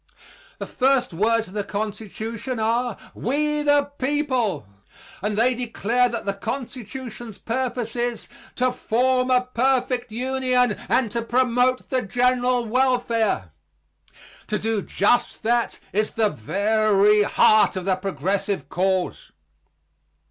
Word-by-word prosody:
The - - -5
first 265 -5 +1
words 225 +5 +1
of 185 - -13
the 205 -1 -2
Constitution 220 +4 -5
are 230 +1 0 0.2
"We 300 +4 0
the 290 -1 +2
people," 260 - 0 0.6
and 210 +1 -2
they 245 +3 +3
declare 245 0 0
that 235 - -5
the 200 - 0
Constitution's 240 -1 -6
purpose 240 -1 -3
is 240 -1 -2 0.3
"to 255 0 +1
form 250 +1 +1
a 250 0 +3
perfect 250 -1 +1
Union 255 0 +1 0.2
and 245 -5 +2
to 235 - -1
promote 250 +1 +1
the 260 -1 +1
general 245 +2 +1
welfare." 235 - +1 1.0
To 210 - -1
do 220 -1 -1
just 205 +6 +1
that 235 +1 0
is 215 +2 0
the 220 -2 +2
very 210 - +2
heart 210 0 +4
of 185 -1 -4
the 190 -1 +2
progressive 195 +1 -2
cause. 190 - -1
235 Hz, 120 wpm, -23 LUFS, 210-255 Hz, 1.0 s, heart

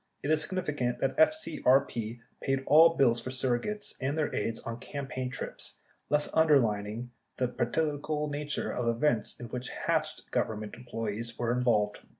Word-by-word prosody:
It 145 - 0
is 155 -1 +3
significant 145 -9 -2
that 135 - 0
FCRP 135 - +2 0.2
paid 135 0 0
all 165 +2 +7
bills 120 -3 +4
for 115 - -6
surrogates 130 +11 -1
and 140 +4 -1
their 155 - 0
aides 115 +2 -1
on 115 0 -5
campaign 135 -2 -4
trips 125 - -6 0.3
thus 150 0 +3
underlining 120 -7 +2 0.3
the 125 - +1
political 150 +4 -1
nature 145 0 -2
of 125 - -2
the 115 - +3
events 115 -2 0
in 120 -1 -7
which 125 0 -3
"Hatched" 155 -2 -1
Government 110 -2 -1
employees 115 -1 -5
were 120 -1 0
involved. 110 -5 +2
130 Hz, 155 wpm, -30 LUFS, 115-150 Hz, 0.3 s, all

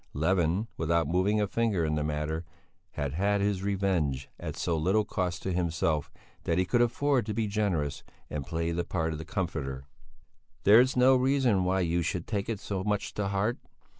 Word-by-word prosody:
Levin, 90 +5 +1
without 85 +1 +1
moving 95 +6 +2
a 105 - +2
finger 105 -5 0
in 75 - 0
the 75 -1 0
matter, 75 +2 -2 0.5
had 70 -1 -3
had 100 +5 +1
his 100 -1 0
revenge 95 -9 0
at - - -6
so 85 - 0
little 95 +7 +2
cost 90 -4 -2
to 95 - -1
himself 85 -4 0 0.3
that 85 - +1
he 90 - +2
could 120 +6 +2
afford 130 +2 +2
to 105 0 -4
be 115 0 0
generous, 100 -9 -1 0.3
and 70 -2 -5
play 85 0 -1
the 85 +1 -1
part 80 -2 -2
of 75 - -5
the 80 - -7
comforter. 80 -8 -3 0.8
"There's 120 +6 +6
no 130 +1 +6
reason 130 -7 +2
why 95 +1 +1
you 85 0 +1
should 85 +1 -2
take 105 -1 -2
it 110 -3 -2
so 95 -2 -3
much 105 0 -1
to 105 -1 -2
heart. 100 +4 0
95 Hz, 190 wpm, -29 LUFS, 80-105 Hz, 0.8 s, There's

